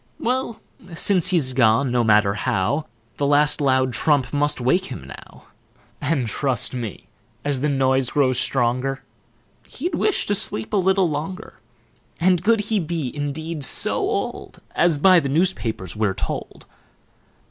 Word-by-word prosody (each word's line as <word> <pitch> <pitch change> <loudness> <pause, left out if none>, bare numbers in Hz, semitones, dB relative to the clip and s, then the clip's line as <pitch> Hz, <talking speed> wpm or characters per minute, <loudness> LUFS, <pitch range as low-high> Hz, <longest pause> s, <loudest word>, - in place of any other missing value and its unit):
Well, 250 -1 -2 0.4
since 185 +1 +2
he's 160 -9 +1
gone, 120 +1 +3
no 120 -1 +2
matter 105 -2 +4
how, 105 +9 -1 0.3
The 140 - 0
last 145 +1 +3
loud 130 -2 +2
trump 135 +3 +1
must 145 -1 +1
wake 155 +10 +1
him 125 - -8
now: 70 - -13 0.6
And, 145 -3 0
trust 130 +3 -1
me, 115 -5 -6 0.4
as 140 -3 0
the 150 - +1
noise 130 -2 +1
grows 130 -4 +1
stronger, 130 +1 0 0.6
He'd 345 +7 -4
wish 420 - +1
to 205 - 0
sleep 195 - -2
a - - +3
little 190 0 +3
longer. 165 +8 -6 0.6
And 180 0 +2
could 225 +1 +3
he 210 0 -1
be 160 -6 -3
indeed 150 +2 -4
so - - 0
old - - -3
As 170 -3 +3
by 185 +4 +6
the 140 - -3
news 175 +7 +2
papers 110 - -5
we're 105 -3 0
told? - - -5
145 Hz, 150 wpm, -22 LUFS, 125-175 Hz, 0.6 s, by